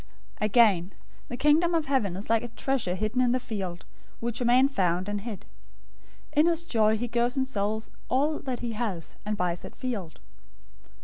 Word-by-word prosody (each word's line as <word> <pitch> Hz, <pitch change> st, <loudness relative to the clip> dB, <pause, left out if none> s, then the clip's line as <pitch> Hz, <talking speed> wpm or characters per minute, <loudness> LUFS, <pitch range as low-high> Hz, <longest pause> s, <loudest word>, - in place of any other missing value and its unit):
013:044 -, -, 0 dB
"Again, 200 Hz, -4 st, +4 dB, 0.3 s
the 245 Hz, -, -5 dB
Kingdom 320 Hz, +5 st, +4 dB
of 320 Hz, -2 st, +1 dB
Heaven 240 Hz, -10 st, 0 dB
is 200 Hz, -, -4 dB
like 225 Hz, 0 st, +3 dB
a 240 Hz, -, -5 dB
treasure 235 Hz, -6 st, -1 dB
hidden 215 Hz, +6 st, 0 dB
in 245 Hz, -1 st, +3 dB
the 255 Hz, -, +1 dB
field, 190 Hz, -7 st, -5 dB, 0.3 s
which 235 Hz, +1 st, -3 dB
a -, -, +1 dB
man 250 Hz, +3 st, +5 dB
found, 185 Hz, -7 st, 0 dB
and 205 Hz, 0 st, -2 dB
hid. 220 Hz, -2 st, -7 dB, 0.9 s
In 300 Hz, +3 st, +4 dB
his 340 Hz, 0 st, +2 dB
joy, 220 Hz, -8 st, +2 dB
he 245 Hz, +3 st, -2 dB
goes 240 Hz, +2 st, 0 dB
and 265 Hz, -, +2 dB
sells 220 Hz, -3 st, -2 dB, 0.2 s
all 295 Hz, +4 st, +1 dB
that 255 Hz, -3 st, -4 dB
he 240 Hz, -1 st, -2 dB
has, 210 Hz, -7 st, -4 dB
and 210 Hz, 0 st, -1 dB
buys 175 Hz, -2 st, -1 dB
that -, -, -10 dB
field. 215 Hz, -11 st, -5 dB
230 Hz, 190 wpm, -27 LUFS, 200-260 Hz, 0.9 s, man